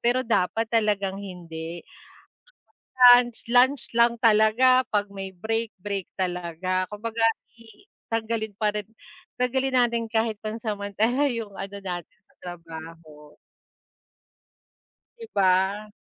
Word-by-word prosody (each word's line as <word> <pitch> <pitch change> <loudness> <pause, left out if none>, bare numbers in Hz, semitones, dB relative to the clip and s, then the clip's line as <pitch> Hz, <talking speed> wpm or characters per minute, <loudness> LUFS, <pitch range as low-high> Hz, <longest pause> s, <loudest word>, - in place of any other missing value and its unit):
pero 250 +2 +2
dapat 225 +1 0
talagang 200 -3 +1
hindi. 170 -3 -8 1.1
'Pag 245 -1 +8
lunch, 230 - -16
lunch 255 +3 +4
lang 235 0 +3
talaga, 225 +4 +5
pag 205 -1 +1
may 195 -1 -6
break, 225 +4 -2
break 200 -1 -5
talaga, 185 0 -2
kumbaga 225 +2 -4 0.3
i 230 - -19 0.2
tanggalin 220 -2 -2
pa 210 -1 +1
rin, 210 -1 -4 0.5
taggalin 260 +1 0
natin 235 -1 -2
kahit 225 -1 0
pansamantala 220 +4 -1
yung 225 -4 -5
ano 200 +1 -6
natin 175 -3 -7
sa - - -32
trabaho. 165 -3 -11 1.8
'Di 455 -1 -10
ba. 195 +2 +2
210 Hz, 110 wpm, -25 LUFS, 185-230 Hz, 1.8 s, Pag